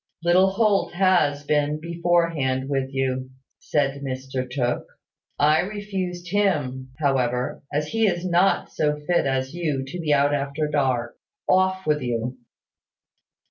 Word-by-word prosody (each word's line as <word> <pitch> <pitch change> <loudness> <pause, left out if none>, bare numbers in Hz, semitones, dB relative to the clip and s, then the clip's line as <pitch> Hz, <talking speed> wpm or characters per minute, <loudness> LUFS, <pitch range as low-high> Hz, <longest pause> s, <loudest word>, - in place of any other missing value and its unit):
"Little 180 +3 +5
Holt 200 0 +1
has 175 -6 +2
been 150 0 +1
beforehand 170 -6 0
with 135 -1 -1
you," 130 -1 -1 0.3
said 140 -2 -1
Mr 130 -1 -4
Tooke. 125 -2 -1 0.5
"I 150 +2 +4
refused 190 -3 -4
him, 145 -11 0
however, 125 -4 0
as 150 +1 -1
he 225 -1 +2
is 175 -2 -1
not 180 +2 +2
so 150 -1 +1
fit 150 0 +1
as 130 0 -1
you 155 -6 -1
to 160 +7 -7
be 160 -3 -1
out 145 0 +3
after 145 +2 -1
dark. 130 -5 -1 0.3
Off 185 0 +2
with 150 -1 +1
you!" 120 +1 -3
150 Hz, 135 wpm, -24 LUFS, 135-175 Hz, 0.5 s, Little